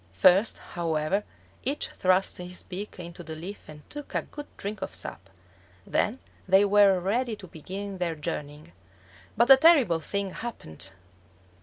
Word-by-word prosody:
First, 185 - +5 0.2
however, 165 +3 0 0.4
each 280 +3 0
thrust 185 +1 +2
his 180 0 -7
beak 200 +3 -6
into 170 -1 -8
the 160 -1 -7
leaf 180 +5 -8
and 150 -1 -12
took 295 -1 -8
a - - +1
good 295 0 -9
drink 205 0 -5
of 190 - -4
sap. - - -7 0.6
Then 220 +5 +1 0.3
they 190 +2 +6
were 200 -2 +5
ready 225 +6 0
to 200 - -11
begin 190 +4 -7
their 170 -2 -1
journeying. 150 - -5 0.7
But 235 +4 +5
a 270 - +11
terrible 265 - +6
thing 200 +3 -3
happened! 95 - -6
190 Hz, 150 wpm, -27 LUFS, 165-210 Hz, 0.7 s, a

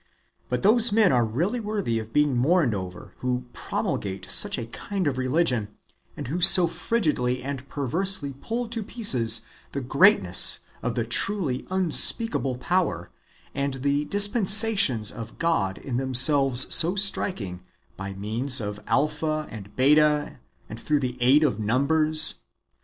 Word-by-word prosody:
But - - -4
those 225 +3 +3
men 210 -2 +2
are 125 -2 +1
really 165 - -3
worthy 205 - -4
of 110 0 -10
being 150 0 0
mourned 140 0 +1
over, 90 -2 -9
who 125 0 -4
promulgate 95 -1 -5
such - - +3
a 120 - -6
kind 190 - -6
of 140 -3 -2
religion, 130 -6 -2 0.4
and - - -7
who 170 +7 -5
so 175 +1 +9
frigidly 150 - -3
and 140 -1 -8
perversely 145 +2 -2
pull 235 +1 -5
to 230 -1 -3
pieces 130 - +1 0.3
the 140 - -4
greatness 130 - +4 0.2
of 125 - -4
the 120 - -2
truly 140 - -3
unspeakable 185 - +1
power, 130 - -3 0.4
and 140 -1 -4
the 140 +2 -2
dispensations 200 - +3
of 115 -1 -11
God 160 - -2
in 125 -3 -6
themselves 130 0 +4
so 170 +3 +4
striking, 120 - -3 0.3
by 100 0 -8
means 115 +7 -3
of 105 -1 -7
Alpha 155 +1 -2
and 105 -2 -12
Beta, 150 +2 +1 0.3
and 110 - -10
through 150 +3 -2
the 125 -2 -4
aid 135 +5 +3
of 125 -8 -1
numbers. 155 +8 0
140 Hz, 140 wpm, -23 LUFS, 120-180 Hz, 0.4 s, so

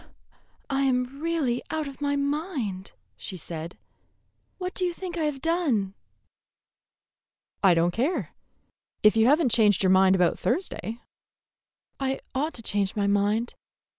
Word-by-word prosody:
"I 275 -1 0
am 255 +1 0
really 315 -7 0
out 315 -2 -2
of 275 0 -10
my 285 0 +1
mind," 280 - -2 0.2
she 185 - -6
said. 165 0 -7 0.8
"What 365 0 -4
do 370 - -1
you 350 -1 0
think 360 -1 -6
I 325 -2 0
have 275 -3 -3
done?" 290 - +1 1.7
"I 190 -4 +5
don't 170 +1 +2
care, 270 - -1 0.7
if 215 0 +6
you 225 +1 +4
have 295 +5 +5
n't 270 -8 +2
changed 210 -4 +4
your 185 - +4
mind 190 0 +5
about 180 -2 +2
Thursday." 235 - -2 1.0
"I 270 0 -1
ought 295 +5 -1
to 230 - -7
change 200 -2 0
my 205 -2 +1
mind. 205 +3 +1
250 Hz, 145 wpm, -26 LUFS, 200-300 Hz, 1.7 s, if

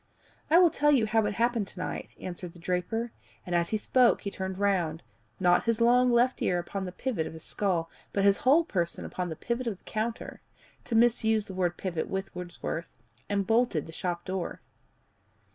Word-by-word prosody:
"I 325 - +6
will 350 -2 +6
tell 295 +1 +3
you 255 -6 +4
how 220 -1 +2
it 205 - -3
happened 235 -3 +1
to 185 - -11
night," - - -4
answered 180 -1 -6
the - - -15
draper, 180 +7 -2 0.3
and 180 - -4
as 170 -1 +2
he 215 - +1
spoke 245 +3 +3
he 200 - -4
turned 190 -1 -4
round, 180 -5 0 0.4
not 175 -1 +4
his 230 -1 +2
long 245 +2 +5
left 245 +2 +3
ear 180 - +2
upon 190 +3 -4
the 180 - -5
pivot 185 -5 -2
of 160 - -8
his 160 - -9
skull, 180 -5 -1 0.2
but 200 - 0
his 200 0 +5
whole 290 +6 +4
person 175 - -2
upon 180 -1 -3
the 160 - -4
pivot 235 +7 -3
of 210 -5 -2
the - - -36
counter 225 +2 -4 0.4
to 230 - -2
misuse 225 -2 +3
the 190 - -8
word 180 -2 0
pivot 175 -4 -3
with 190 0 -4
Wordsworth 175 -1 -6 0.3
and 200 -1 0
bolted 225 - +2
the 160 - -10
shop 175 0 -3
door. 185 -2 -3
200 Hz, 200 wpm, -29 LUFS, 180-235 Hz, 0.4 s, I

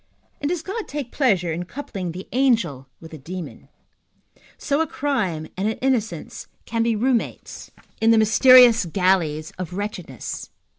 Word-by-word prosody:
and 290 - -1
does 345 -2 -2
God 415 +4 -5
take 280 -4 -5
pleasure 190 - +1
in 175 +2 -4
coupling 190 -6 -6
the 185 +3 -8
angel 220 - +1
with 160 - -12
the 155 - -9
demon? 175 +5 -8 0.9
So 290 +1 0
a 325 - 0
crime 210 - -2
and 195 +3 -1
an 220 - -2
innocence 225 -10 -2 0.2
can 230 0 -2
be 230 0 +1
room 245 +3 +2
mates - - -8 0.3
in 225 - +4
the 230 - +6
mysterious 235 +1 +7
galleys 170 -4 0
of 180 -1 -5
wretchedness? 185 - -6
215 Hz, 155 wpm, -22 LUFS, 175-255 Hz, 0.9 s, mysterious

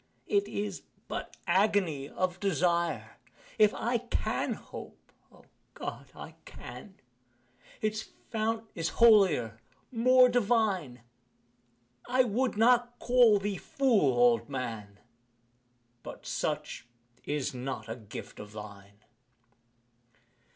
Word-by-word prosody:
It 405 -1 +1
is 205 -2 -4 0.3
but - - -6
agony 185 -6 +1
of 185 0 -2
desire: 170 - 0 0.4
If 210 -1 +6
I 235 +1 0
can 245 - -2
hope - - -11 0.2
O - - -20 0.3
God! - - -6
I - - -9
can 195 -3 -11 0.9
Its 215 0 -2 0.2
fount 225 0 -1
is 165 -1 -2
holier 185 - +5 0.3
more 255 +1 +6
divine 210 - +1 1.1
I 255 +1 +4
would 245 0 -1
not 240 +1 +3
call 240 -4 +5
thee 200 0 -3
fool, 210 - +2
old 120 0 +4
man, 115 -7 -5 1.0
But - - -10
such - - -3 0.4
is 145 -3 -2
not 125 -3 -5
a 115 - -4
gift 110 -4 -10
of 105 0 -10
thine. 100 -1 -11
190 Hz, 105 wpm, -30 LUFS, -, 1.1 s, If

